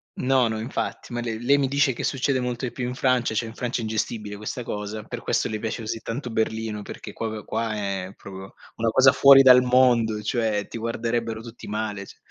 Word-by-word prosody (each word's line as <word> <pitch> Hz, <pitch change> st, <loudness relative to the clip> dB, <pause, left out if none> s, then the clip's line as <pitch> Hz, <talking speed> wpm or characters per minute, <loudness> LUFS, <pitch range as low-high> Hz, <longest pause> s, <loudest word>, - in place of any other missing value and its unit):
No, 130 Hz, -2 st, +2 dB
no, 110 Hz, 0 st, -2 dB
infatti, 120 Hz, +1 st, -4 dB
ma 120 Hz, -, -2 dB
lei 115 Hz, -2 st, -4 dB
lei 140 Hz, +3 st, +4 dB
mi 135 Hz, -, +2 dB
dice 140 Hz, -1 st, +2 dB
che -, -, -6 dB
succede 135 Hz, 0 st, 0 dB
molto 125 Hz, +1 st, -3 dB
di 120 Hz, -, -4 dB
più 125 Hz, 0 st, -4 dB
in 125 Hz, -, -4 dB
Francia, 125 Hz, -4 st, +1 dB
cioè, 115 Hz, -, 0 dB
in 110 Hz, -, -9 dB
Francia 125 Hz, 0 st, -3 dB
è -, -, -3 dB
ingestibile 110 Hz, -1 st, -3 dB
questa 105 Hz, +4 st, -5 dB
cosa, 105 Hz, 0 st, -5 dB
per -, -, -7 dB
questo -, -, 0 dB
le 110 Hz, -1 st, -4 dB
piace 110 Hz, +1 st, -4 dB
così 110 Hz, +1 st, -4 dB
tanto 120 Hz, +2 st, -5 dB
Berlino, 110 Hz, -1 st, -2 dB
perché -, -, -9 dB
proprio 110 Hz, -2 st, -5 dB
qua 110 Hz, -1 st, -2 dB
è, 100 Hz, -2 st, -3 dB
proprio, 95 Hz, -1 st, -11 dB, 0.2 s
una 115 Hz, 0 st, +1 dB
cosa 130 Hz, +3 st, +6 dB
fuori 135 Hz, -1 st, +8 dB
dal 125 Hz, -1 st, +8 dB
mondo, 125 Hz, -4 st, +3 dB
cioè, 110 Hz, -3 st, 0 dB
ti 115 Hz, -, -7 dB
guarderebbero 115 Hz, 0 st, -2 dB
tutti 115 Hz, 0 st, -11 dB
male 105 Hz, -2 st, -4 dB
ci -, -, -14 dB
115 Hz, 220 wpm, -24 LUFS, 110-125 Hz, 0.2 s, fuori